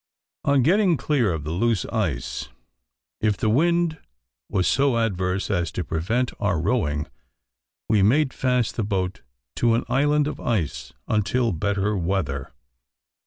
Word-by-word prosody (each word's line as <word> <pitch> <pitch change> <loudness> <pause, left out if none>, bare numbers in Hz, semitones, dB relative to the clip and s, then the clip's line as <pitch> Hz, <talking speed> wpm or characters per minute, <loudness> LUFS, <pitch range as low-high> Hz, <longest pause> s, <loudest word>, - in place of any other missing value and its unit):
On 140 -2 +4
getting 180 - +3
clear 130 -10 +1
of 80 -3 -3
the 75 - -4
loose 110 +2 +1
ice, 65 -1 -2 0.7
if 105 -2 +1
the 110 - +1
wind 170 +4 +2 0.5
was 90 - +1
so 135 -3 +2
adverse 95 -3 -1
as 85 -4 0
to 90 - -2
prevent 110 - -1
our 100 -6 +1
rowing, 75 -6 0 0.8
we 105 -2 +3
made 130 +7 +3
fast 125 -3 0
the 110 - 0
boat 95 -3 -2 0.4
to 115 -1 +3
an 115 - 0
island 145 +2 +2
of 150 - -4
ice 100 -11 -2 0.2
until 110 +3 +1
better 100 +4 0
weather. 85 -7 -2
110 Hz, 140 wpm, -24 LUFS, 90-130 Hz, 0.8 s, On